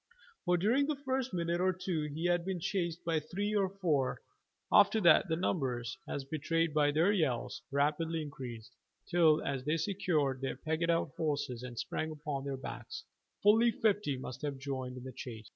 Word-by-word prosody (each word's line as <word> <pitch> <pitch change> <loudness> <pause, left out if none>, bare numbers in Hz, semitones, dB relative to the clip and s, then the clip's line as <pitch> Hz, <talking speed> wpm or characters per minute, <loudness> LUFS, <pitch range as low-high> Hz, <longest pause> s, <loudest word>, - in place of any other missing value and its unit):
For 180 0 +3
during 240 +10 +2
the 305 - 0
first 265 -2 -2
minute 170 0 -1
or 185 0 +3
two 180 -4 -2
he 150 +3 -4
had 175 -1 +2
been 190 0 -2
chased 175 -1 -2
by 165 -2 +2
three 200 +7 -3
or 195 -2 +2
four; 165 -9 0 0.5
after 205 +2 +6
that 175 +1 +6
the 160 - +2
numbers, 130 -8 -1
as 140 - -3
betrayed 160 +2 0
by 150 -1 +4
their 160 +7 +3
yells, 155 - 0
rapidly 155 +3 0
increased, 125 -5 -8 0.3
till 165 -3 +4
as 135 -2 -2
they 150 +3 +1
secured 155 -7 0
their 135 - -2
pegged 160 +4 -1
out 165 -4 +1
horses 145 -6 -1
and 125 -1 -8
sprang 155 +7 -2
upon 145 -3 -4
their 140 -1 -3
backs, 130 - -7 0.4
fully 220 +3 +6
fifty 205 - +1
must 125 0 -7
have 145 -2 -3
joined 130 -2 -4
in 125 - -8
the 130 0 -7
chase. 115 -3 -8
160 Hz, 180 wpm, -33 LUFS, 135-185 Hz, 0.5 s, after